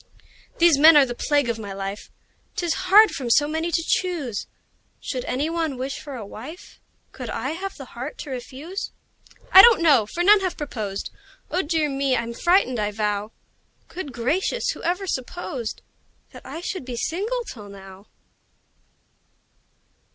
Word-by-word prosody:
These 335 -4 +5
men 315 +1 +9
are 285 - +7
the 245 - -4
plague 285 +2 +1
of 230 -1 -2
my 200 -2 -6
life: 195 +1 -6 0.5
'Tis 345 -2 0 0.2
hard 425 +1 +8
from 255 -3 -4
so 290 +5 +4
many 320 +2 -2
to 330 0 +1
choose! 320 - -1 0.5
Should 255 -2 -4
any 275 +4 -1
one 325 -4 -2
wish 265 +2 -4
for 285 -3 -8
a 225 -4 -7
wife, 275 - -11 0.3
Could 250 -3 -7
I 265 +5 -3
have 385 +4 -5
the 270 - -8
heart 255 +5 -6
to 290 - -8
refuse? 275 +9 -6 0.6
I 380 - +11
don't 470 +1 +7
know 270 -10 +5
for 345 +10 -2
none 415 +3 +7
have 370 -2 -3
proposed 215 -9 -5 0.4
Oh, 365 - +1
dear 315 -1 0
me! 275 -2 0
I'm 235 0 -3
frightened, 345 - +2
I 210 0 0
vow! 210 0 -2 0.6
Good 345 -6 -6
gracious! 310 - -1
who - - -9
ever 360 +3 -1
supposed 260 - -4 0.5
That - - -12
I 330 - -7
should 370 -2 -4
be 250 -1 -6
single 425 - -2
till 210 - -10
now? 195 0 -13
280 Hz, 165 wpm, -23 LUFS, 235-345 Hz, 0.6 s, I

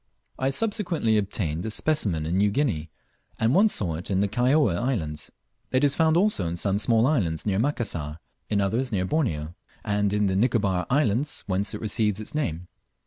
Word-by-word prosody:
I 130 - +1
subsequently 175 - 0
obtained 90 -5 -2
a 110 - -3
specimen 105 - 0
in 85 +3 -1
New 105 +1 +4
Guinea; 100 - -1 0.5
and 115 +3 +2
once 205 +5 +4
saw 85 -6 -2
it 90 - -7
in 95 -1 +1
the 100 - +2
Kaióa 125 - +2
islands. 80 - -2 0.4
It 130 +2 +2
is 140 -1 +4
found 160 +1 +3
also 190 - +2
in 85 +1 -3
some 100 +2 0
small 115 +1 +3
islands 95 - 0
near 100 -2 +1
Macassar, 100 - -2 0.3
in 100 -1 +1
others 115 +7 0
near 95 -3 0
Borneo; 85 - -1 0.3
and 105 -1 +1
in 105 0 +1
the 95 -1 +1
Nicobar 100 -4 +1
islands, 135 0 0
whence 100 +1 -1
it - - -7
receives 105 -2 0
its 110 +8 -7
name. 90 - -2
105 Hz, 185 wpm, -25 LUFS, 90-135 Hz, 0.5 s, New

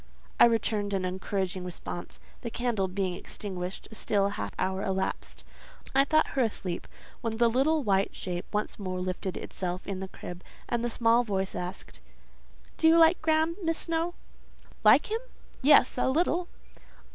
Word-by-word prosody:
I - - +10
returned 215 -3 +1
an 185 -1 -1
encouraging 185 0 -2
response. 175 0 -7 0.2
The 235 - -4
candle 230 -5 0
being 185 -1 -1
extinguished, 185 0 -6
a - - -9
still 205 -2 +1
half 105 - -4
hour 190 0 -1
elapsed. 190 -1 -3 0.5
I 270 +1 +5
thought 310 +2 +3
her 270 - 0
asleep, 195 -6 -2 0.3
when 225 -1 -2
the 235 0 +5
little 280 +6 +2
white 195 -3 +1
shape 175 -1 -4
once 210 +1 -2
more 185 -2 -3
lifted 185 +1 -3
itself 180 0 -4
in 195 -2 -3
the 190 - -4
crib, 175 -1 -9 0.2
and 240 -1 -1
the 240 - 0
small 230 +1 +3
voice 195 -4 -2
asked—"Do 180 - -6
you 325 +1 +7
like 330 +1 +6
Graham, 315 +1 +2
Miss 330 -1 0
Snowe?" 335 +1 0 0.7
"Like - - +6
him! 445 - +1 0.4
Yes, 275 -2 +5
a - - +2
little." 345 +4 +1
210 Hz, 160 wpm, -29 LUFS, 190-270 Hz, 0.7 s, I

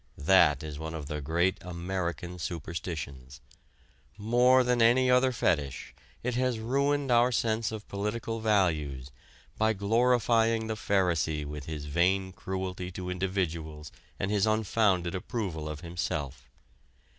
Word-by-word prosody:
That 75 -3 +4
is 75 -1 -6
one 80 +1 -5
of 75 -3 -5
the 75 0 -4
great 85 +6 +1
American 90 -1 -4
superstitions. 75 -6 -6 0.8
More 125 +4 +4
than 125 -1 +1
any 125 +2 +5
other 125 +1 +4
fetish 75 - -1 0.3
it 125 +1 -1
has 125 -1 0
ruined 140 +4 0
our 120 +1 +4
sense 115 -2 0
of 110 -2 -7
political 110 +3 -3
values 80 - 0 0.5
by 110 0 +3
glorifying 115 +1 +2
the 110 - -2
pharisee 85 -7 0
with 75 -1 -7
his 75 -2 -5
vain 90 +5 +1
cruelty 95 -1 -4
to 90 -1 -5
individuals 85 -5 -3 0.3
and 95 - -1
his 105 0 +2
unfounded 105 -4 +1
approval 90 -5 -4
of 75 0 -6
himself. 75 -7 -4
95 Hz, 130 wpm, -29 LUFS, 80-110 Hz, 0.8 s, any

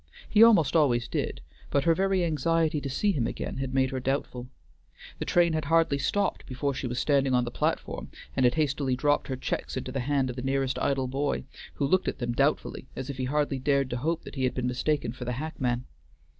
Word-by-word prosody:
He 215 - +4
almost 205 -11 +6
always 125 -7 +3
did, - - -3 0.3
but 140 - +1
her 165 - +4
very 190 0 +1
anxiety 160 0 +1
to 140 - -4
see 205 +10 +1
him 130 -11 0
again - - -5
had 135 -1 -3
made 130 0 +2
her 130 - -2
doubtful. 125 -1 -2 0.7
The - - -2
train 170 -2 +3
had 155 -1 -1
hardly 165 -2 +3
stopped 200 +8 -1
before 140 +2 -2
she 130 0 -3
was 120 0 -4
standing 135 -1 +2
on 125 - +3
the 120 - -4
platform - - -2 0.3
and 130 - +2
had 125 0 +4
hastily 140 -4 +1
dropped 145 +3 +1
her 130 - -2
checks 130 - -3
into 130 0 -4
the 135 - -2
hand 135 0 0
of - - -9
the 125 - -4
nearest 135 0 0
idle 135 -2 0
boy, 140 +3 -1 0.3
who 140 - 0
looked 185 +7 +2
at - - -1
them 120 -1 -2
doubtfully, 140 0 0
as 135 +2 -4
if 135 - -9
he 130 - -1
hardly 145 0 0
dared 140 -1 +1
to 125 - -1
hope 160 +6 -1
that - - -10
he 130 - -3
had 125 - -1
been 125 - -1
mistaken 125 0 0
for 125 +1 -8
the 125 - -2
hackman. 125 -3 -2
135 Hz, 225 wpm, -28 LUFS, 130-155 Hz, 0.7 s, almost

